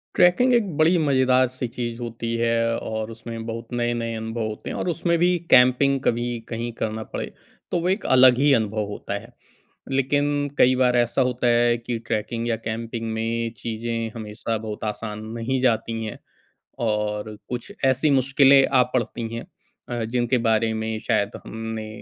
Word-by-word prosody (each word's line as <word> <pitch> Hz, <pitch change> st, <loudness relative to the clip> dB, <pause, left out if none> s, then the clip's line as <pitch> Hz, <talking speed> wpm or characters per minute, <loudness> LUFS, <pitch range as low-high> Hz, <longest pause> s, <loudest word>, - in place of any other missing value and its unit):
Trekking 180 Hz, +9 st, +5 dB
एक 235 Hz, -2 st, +4 dB
बड़ी 165 Hz, +3 st, +4 dB
मज़ेदार-सी 130 Hz, -2 st, +2 dB
चीज़ 120 Hz, 0 st, -5 dB
होती 115 Hz, 0 st, -4 dB
है 115 Hz, 0 st, +1 dB, 0.2 s
और 110 Hz, 0 st, -4 dB
उसमें 115 Hz, 0 st, -7 dB
बहुत 115 Hz, 0 st, -5 dB
नए-नए 120 Hz, -1 st, -1 dB
अनुभव 110 Hz, +1 st, -4 dB
होते 105 Hz, 0 st, -6 dB
हैं -, -, -4 dB
और -, -, -2 dB
उसमें 170 Hz, 0 st, +1 dB
भी 175 Hz, +1 st, +4 dB, 0.2 s
कैंपिंग 130 Hz, +2 st, +5 dB
कभी 120 Hz, +1 st, +1 dB, 0.2 s
कहीं 120 Hz, +1 st, -3 dB
करना 110 Hz, 0 st, -2 dB
पड़े -, -, -2 dB, 0.5 s
तो 175 Hz, -, +1 dB
वो 175 Hz, -, 0 dB
एक 195 Hz, +4 st, -1 dB
अलग 130 Hz, -1 st, +6 dB
ही 145 Hz, +2 st, +4 dB
अनुभव 110 Hz, -2 st, 0 dB
होता 100 Hz, -, -5 dB
है। -, -, -15 dB, 0.6 s
लेकिन 145 Hz, +2 st, +1 dB
कई 130 Hz, +1 st, +5 dB
बार 125 Hz, -1 st, +3 dB
ऐसा 120 Hz, +2 st, +2 dB
होता 125 Hz, -1 st, 0 dB
है 120 Hz, 0 st, +3 dB
कि 120 Hz, 0 st, -4 dB
ट्रैकिंग 115 Hz, +1 st, -2 dB
या 115 Hz, -, +2 dB
कैंपिंग 115 Hz, 0 st, -4 dB
में 115 Hz, +1 st, -2 dB
चीज़ें 115 Hz, 0 st, -3 dB
हमेशा 110 Hz, 0 st, -4 dB
बहुत 110 Hz, -1 st, -6 dB
आसान 105 Hz, 0 st, -6 dB
नहीं 130 Hz, +3 st, -1 dB
जाती 115 Hz, -2 st, 0 dB
हैं 110 Hz, -, -6 dB, 0.7 s
और 105 Hz, 0 st, -2 dB
कुछ 120 Hz, -1 st, -5 dB
ऐसी 130 Hz, +3 st, +3 dB
मुश्किलें 135 Hz, 0 st, +5 dB
आ 130 Hz, -2 st, +4 dB
पड़ती 115 Hz, -1 st, -3 dB
हैं 115 Hz, -, -5 dB, 0.4 s
अ, 120 Hz, -2 st, -2 dB
जिनके 120 Hz, +2 st, 0 dB
बारे 110 Hz, 0 st, +2 dB
में 110 Hz, 0 st, -2 dB
शायद 100 Hz, 0 st, +2 dB, 0.2 s
हमने 110 Hz, 0 st, -5 dB
120 Hz, 165 wpm, -23 LUFS, 110-130 Hz, 0.7 s, अलग